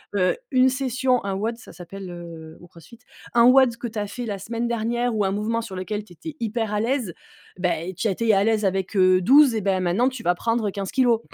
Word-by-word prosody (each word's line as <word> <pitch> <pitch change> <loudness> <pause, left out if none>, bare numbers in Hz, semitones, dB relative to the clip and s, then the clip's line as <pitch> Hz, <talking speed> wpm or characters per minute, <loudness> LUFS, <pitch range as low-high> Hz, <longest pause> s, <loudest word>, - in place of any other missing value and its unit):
Heu, 185 - +2
une 260 -1 +4
session, 255 -1 0
un 195 - -2
WOD 225 +4 -2
ça 240 - -14
s'appelle, 185 +2 -9
heu, 165 -2 -10
au 175 - -14
Crossfit, 175 +9 -16 0.3
un 235 - +5
WOD 255 -1 +5
que 240 - -5
tu 220 -2 -5
as 205 - -3
fait 245 +4 -6
la 205 -3 -4
semaine 230 +4 -3
dernière, 235 +1 -1
ou 210 -2 +1
un 190 - 0
mouvement 215 +3 -1
sur 215 -4 -8
lequel 205 +3 -4
tu 180 - -16
étais 310 - -9
hyper 225 -1 -2
à 210 - 0
l'aise, 235 -4 -1 0.4
bah 175 -3 -1
et 180 +3 -6
tu 190 +5 -2
étais 220 +3 +1
à 195 0 +3
l'aise 220 -1 +1
avec, 190 +1 -1
heu, 185 -1 +5
12 270 +5 +6
et 220 - 0
bah 190 -1 0
maintenant 185 +8 +1
tu 260 -3 -9
vas 175 - +3
prendre 230 +2 -1
15 195 -1 -5
kilos. 245 -4 +3
215 Hz, 245 wpm, -23 LUFS, 190-240 Hz, 0.4 s, 12